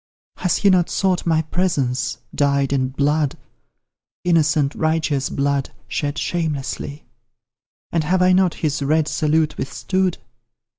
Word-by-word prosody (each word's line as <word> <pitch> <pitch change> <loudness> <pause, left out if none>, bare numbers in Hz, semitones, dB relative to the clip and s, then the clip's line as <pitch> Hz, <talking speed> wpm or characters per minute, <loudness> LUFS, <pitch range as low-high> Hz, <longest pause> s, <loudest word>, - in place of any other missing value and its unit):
Has 180 - +1
he 200 - +4
not 180 -2 +3
sought 185 -3 0
my 160 -1 +3
presence, 135 -8 -1 0.2
dyed 140 -1 +1
in 130 -2 +1
blood 145 +2 0 0.9
Innocent, 155 -4 +2
righteous 155 -3 0
blood, 140 -1 0 0.2
shed 145 0 -2
shamelessly? 150 -3 -3 0.9
And 165 -2 +1
have 180 +3 +2
I 185 - +5
not 185 -2 +3
his 150 -2 -1
red 155 +2 +2
salute 155 -1 +1
withstood? 185 +6 -1
155 Hz, 120 wpm, -21 LUFS, 140-175 Hz, 0.9 s, I